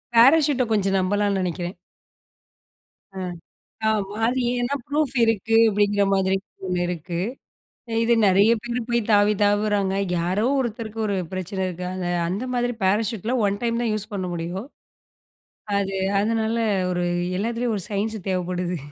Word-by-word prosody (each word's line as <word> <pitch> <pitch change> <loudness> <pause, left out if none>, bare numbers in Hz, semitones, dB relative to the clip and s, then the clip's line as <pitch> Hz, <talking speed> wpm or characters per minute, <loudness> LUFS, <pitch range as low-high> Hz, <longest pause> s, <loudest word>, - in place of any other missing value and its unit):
பேராசூட்ட 275 +2 +6
கொஞ்சம் 195 -2 +2
நம்பலாம்ன்னு 200 +1 +1
நெனைக்கிறேன். 175 0 -3 1.4
அ - - -7 0.7
ஆமா. 205 -2 -1
அது 250 +3 +1 0.2
ஏன்னா, 245 +3 -1
ப்ரூஃப் 290 -2 0
இருக்கு 225 0 +1
அப்படிங்கிற 205 0 +2
மாதிரி 190 0 +2 0.3
ஒண்ணு 180 -1 -1
இருக்கு. 175 0 -4 0.8
இது 235 - +3
நெறைய 200 +3 +5
பேரு 240 0 -2
போய் 235 0 +2
தாவி 205 0 +5
தாவுறாங்க. 205 -1 +2 0.2
யாரோ 185 +6 0
ஒருத்தருக்கு 225 -3 -4
ஒரு 200 - 0 0.2
பிரச்சனை 185 +1 -3
இருக்கு. 180 0 -5
அந்த 185 -1 -3 0.2
அந்த 200 +8 -2
மாதிரி 245 0 0
பேராசூட்ல 215 +4 +1
1 200 0 -2
டைம் 235 0 0
தான் 235 -2 0
யூஸ் 215 +1 -3
பண்ண 185 -2 -2
முடியும். 175 +7 -4 1.1
அது 195 -1 -2 0.2
அதனால 220 +1 0 0.4
ஒரு 175 0 -1 0.3
எல்லாத்துலேயும் 230 +2 -1
ஒரு 190 - -3
சயின்ஸ் 215 +2 -1
தேவைப்படுது. 180 -1 -2
205 Hz, 135 wpm, -23 LUFS, 190-230 Hz, 1.4 s, பேராசூட்ட